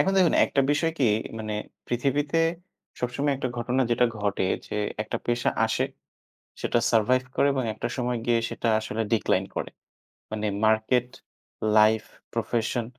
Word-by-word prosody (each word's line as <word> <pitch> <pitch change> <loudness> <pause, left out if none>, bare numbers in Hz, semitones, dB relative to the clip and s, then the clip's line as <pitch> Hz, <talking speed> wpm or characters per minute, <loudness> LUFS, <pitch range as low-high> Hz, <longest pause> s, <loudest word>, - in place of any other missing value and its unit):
এখন 195 - +3
দেখুন 180 -3 +4
একটা 140 - +1
বিষয় 160 +3 +1
কি, 130 -5 +4 0.3
মানে 110 -1 -3 0.3
পৃথিবীতে 140 +5 0 0.6
সবসময় 130 +4 0
একটা 130 -1 -2
ঘটনা 125 +3 +1
যেটা 120 +1 +4
ঘটে 100 -2 0 0.2
যে, - - -4 0.3
একটা 110 - -4
পেশা 120 0 +1 0.2
আসে, - - 0 0.8
সেটা - - +1
সারভাইভ 120 +3 +3
করে - - +4
এবং 130 -2 0
একটা 110 - -3
সময় 125 -1 -1
গিয়ে 120 -1 +3
সেটা 115 - -2
আসলে 110 +1 -3
ডিক্লাইন 95 -3 +1
করে। - - -3 0.6
মানে 110 0 -2 0.2
মার্কেট, 110 +3 +3 0.7
লাইফ, 110 0 +5 0.3
প্রফেশন 115 +1 -1
120 Hz, 145 wpm, -26 LUFS, 110-130 Hz, 0.8 s, লাইফ